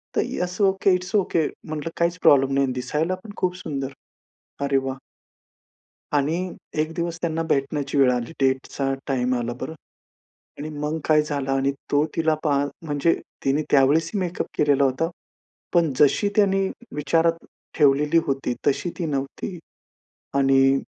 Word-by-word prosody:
तर - - +3
yes 180 +2 -3
okay, 195 0 +3
it's 185 +3 -4
okay! 175 -6 +2 0.2
म्हंटलं 155 +1 -4
काहीच 170 +1 +1
प्रॉब्लेम 135 -1 +5
नाही 140 0 +3
आणि 130 - -2
दिसायला 150 +8 -1
पण 215 - -9
खूप 180 -1 0
सुंदर. 140 -6 -4 0.7
अरे 140 -1 +2
वाह! 135 0 -3 1.2
आणि 145 +3 +2 0.4
एक 155 +1 0
दिवस 170 -1 -3
त्यांना 165 -1 -1
भेटण्याची 140 0 0
वेळ 135 -2 +5
आली. 120 +1 -3
डेटचा 135 0 0
टाइम 125 -2 +1
आला 120 0 -2
बरं 160 - -4 0.9
आणि 150 - -5
मग 150 +2 -2
काय 155 -1 +4
झालं 145 -3 -3
आणि 135 +1 +1 0.2
तो 145 +1 +3
तिला 160 -1 +2
पाह 140 -2 +2 0.2
म्हणजे 150 +2 +2 0.3
तिने 140 +3 +2
त्यावेळेस 145 +4 +4
ही - - +1
मेकअप 180 -1 -2
केलेला 145 -2 +4
होता. 135 +5 +1 0.7
पण 165 -4 +3
जशी 150 +8 +4
त्याने 195 -2 +3 0.3
विचारात 165 +3 +1 0.3
ठेवलेली 150 +2 +4
होती 135 -3 -1
तशी 145 +5 +1
ती 170 - -1
नव्हती. 140 +5 -4 0.8
आणि 135 0 +4
150 Hz, 150 wpm, -24 LUFS, 135-165 Hz, 1.2 s, प्रॉब्लेम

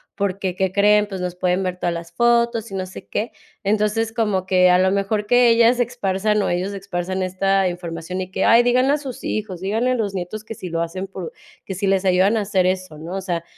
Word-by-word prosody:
porque, 195 -2 -2
¿qué 190 -1 0
creen? 210 +1 +4
Pues, 190 -2 -6
nos 180 -1 -3
pueden 180 +1 0
ver 180 -1 -3
todas 175 -1 -1
las 170 0 -7
fotos 235 +1 +2
y - - -5
no 185 -1 -2
sé 185 - -11
qué". 220 +3 -3 0.3
Entonces, 215 +2 0
como 210 -5 0
que 185 -1 +4
a 180 - +5
lo 190 +1 +3
mejor 200 +2 0
que 245 +2 +5
ellas 230 +1 +5
se 245 - +3
esparzan, 210 -3 -1
o, - - 0
ellos 185 +3 -1
esparzan 185 -1 -3
esta 195 +1 +1
información, 175 +1 -5
y 185 - -5
que: 190 - 0
"Ay, 230 +1 +6
díganle 255 +3 +3
a 300 - +2
sus 270 -4 -8
hijos, 200 -5 -3
díganle 225 +6 0
a 255 - +1
los 210 -4 -2
nietos, 190 +3 -5
que 220 - -7
si 185 -3 -7
lo 165 0 -2
hacen 185 +3 -4
por 185 -3 -7 0.3
que 190 - -5
si 195 +2 -1
les 195 0 +1
ayudan 190 +4 +3
a - - +1
hacer 195 -2 +1
eso", 185 -4 -2
¿no? 165 +4 -7
O 195 - -3
sea, 175 -3 -3
195 Hz, 245 wpm, -21 LUFS, 185-215 Hz, 0.3 s, Ay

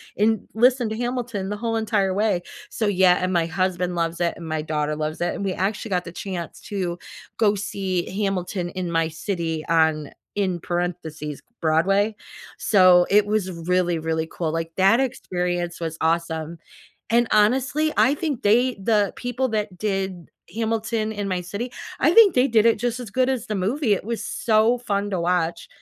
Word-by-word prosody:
and 215 0 +1
listen 245 +1 +3
to 220 - -3
Hamilton 240 -5 -3
the 205 - -3
whole 230 +1 -2
entire 210 -4 +1
way. 200 -3 +1 0.3
So, 220 - -2
yeah 185 -2 +5
and 185 - 0
my 170 -2 +2
husband 180 +1 -1
loves 170 0 -1
it, 170 - +1
and 170 - -8
my 155 -1 -2
daughter 150 -1 -1
loves 155 +1 -3
it, 175 - 0
and - - -5
we 190 - 0
actually 200 +3 -2
got 180 -1 0
the 170 - -7
chance 175 -2 -6
to 180 -5 -3 0.4
go 210 -2 +3
see 195 -3 -2 0.2
Hamilton 185 -2 -2
in 180 -1 -4
my 165 -1 +2
city 165 -2 -3
on 160 -3 +2 0.2
in 185 -4 0
parentheses, 165 -4 -4 0.2
Broadway, 195 +7 +2 0.4
so, 185 -4 +5
it 205 +1 +5
was 205 -3 -1 0.2
really, 180 -2 +2
really 160 0 -1
cool, 160 -3 -2
like 165 0 -3
that 195 +6 +5
experience 180 -9 -2
was 165 -1 -4
awesome. 165 0 -1 0.5
And 235 0 +3
honestly, 265 +8 +3
I 275 - +5
think 295 -6 -3
they 240 +5 +3
the 205 0 +1
people 245 +1 -2
that 210 -4 -2
did 190 -3 -3 0.2
Hamilton 220 0 -1
in 205 -1 -3
my 185 - 0
city, 205 +8 -5 0.3
I 320 +5 +4
think 425 -7 +7
they 250 +2 +4
did 220 -1 +4
it 230 - +4
just 245 +1 -1
as 235 -5 -7
good 255 +4 +1
as 255 -5 -2
the 215 - -2
movie, 215 +5 +1
it - - -2
was 230 0 -3
so 225 +2 +2
fun 205 -3 -1
to 185 - -1
watch. 170 -1 0
195 Hz, 180 wpm, -23 LUFS, 175-220 Hz, 0.5 s, think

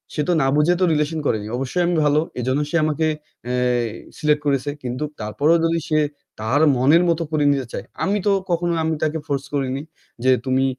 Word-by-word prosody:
সে 150 - 0
তো 180 - +3
না 135 - +2
বুঝে 150 +4 +4
তো - - +2
relation 150 +1 0
করেনি। 105 -1 0
অবশ্যই 135 +7 -1
আমি 175 - +1
ভালো, 150 +1 +4 0.2
এজন্য 130 +4 0
সে 170 - -3
আমাকে 155 +1 0 0.4
অ্যা 125 +1 -1 0.6
select 150 -1 +2
করেছে। 140 -1 +1
কিন্তু 125 +3 -3 0.2
তারপরও 140 +10 +2
যদি 165 0 +1
সে 155 -2 +2 0.4
তার 115 +7 +1 0.2
মনের 150 +8 +5
মতো 165 0 +1
করে 150 -1 +1
নিতে 135 -3 0
চায়, - - -5 0.2
আমি 200 +2 +1
তো - - +5 0.2
কখনো 175 0 +1
আমি 160 0 0
তাকে 155 +1 0
force 140 -1 -2
করিনি 135 -1 -1 0.4
যে, 130 - +5
"তুমি 130 0 +2
150 Hz, 195 wpm, -21 LUFS, 130-160 Hz, 0.6 s, মনের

